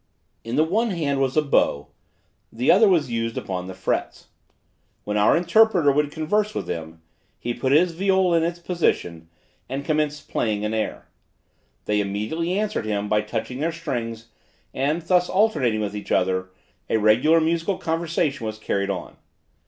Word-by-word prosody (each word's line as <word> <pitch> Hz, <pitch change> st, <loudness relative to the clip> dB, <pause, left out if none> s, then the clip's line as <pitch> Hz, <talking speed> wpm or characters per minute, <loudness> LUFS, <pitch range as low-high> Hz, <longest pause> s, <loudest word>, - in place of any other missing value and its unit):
In 115 Hz, +1 st, -4 dB
the 155 Hz, -, +4 dB
one 215 Hz, +8 st, +1 dB
hand 145 Hz, -7 st, -1 dB
was 135 Hz, +2 st, 0 dB
a 155 Hz, -, +4 dB
bow, 75 Hz, -, +1 dB, 0.6 s
the 125 Hz, +4 st, +2 dB
other 210 Hz, +4 st, +6 dB
was 160 Hz, -9 st, +2 dB
used 115 Hz, 0 st, -2 dB
upon 90 Hz, -1 st, -4 dB
the 95 Hz, -, -7 dB
frets. 95 Hz, -, -3 dB, 0.7 s
When 105 Hz, -, -3 dB
our 105 Hz, +7 st, +4 dB
interpreter 180 Hz, -4 st, +4 dB
would 145 Hz, +1 st, +1 dB
converse 210 Hz, +8 st, -1 dB
with -, -, -3 dB
them, 80 Hz, 0 st, -6 dB, 0.3 s
he 120 Hz, -, -3 dB
put 130 Hz, +2 st, -1 dB
his 170 Hz, +5 st, +4 dB
viol 190 Hz, +1 st, +2 dB
in 165 Hz, -, +3 dB
its 170 Hz, +1 st, -1 dB
position, 90 Hz, -, -1 dB, 0.4 s
and 135 Hz, +2 st, -4 dB
commenced 150 Hz, -1 st, -1 dB
playing 105 Hz, -2 st, -1 dB
an 105 Hz, -, -2 dB
air. 110 Hz, -1 st, -3 dB, 0.8 s
They 105 Hz, 0 st, +1 dB
immediately 110 Hz, -, -2 dB
answered 210 Hz, -, -1 dB
him 105 Hz, -1 st, -2 dB
by 105 Hz, 0 st, +3 dB
touching 125 Hz, +4 st, -4 dB
their 165 Hz, +3 st, 0 dB
strings, 115 Hz, -8 st, -5 dB, 0.4 s
and 150 Hz, +5 st, -1 dB
thus 180 Hz, +1 st, +2 dB
alternating 145 Hz, -, +2 dB
with 105 Hz, -1 st, -3 dB
each 105 Hz, -, -7 dB
other, 95 Hz, 0 st, +1 dB, 0.4 s
a -, -, +2 dB
regular 120 Hz, +10 st, +4 dB
musical 165 Hz, +4 st, 0 dB
conversation 160 Hz, -5 st, -1 dB
was 110 Hz, 0 st, -5 dB
carried 100 Hz, -2 st, -2 dB
on. 95 Hz, -3 st, -5 dB
140 Hz, 165 wpm, -23 LUFS, 105-170 Hz, 0.8 s, other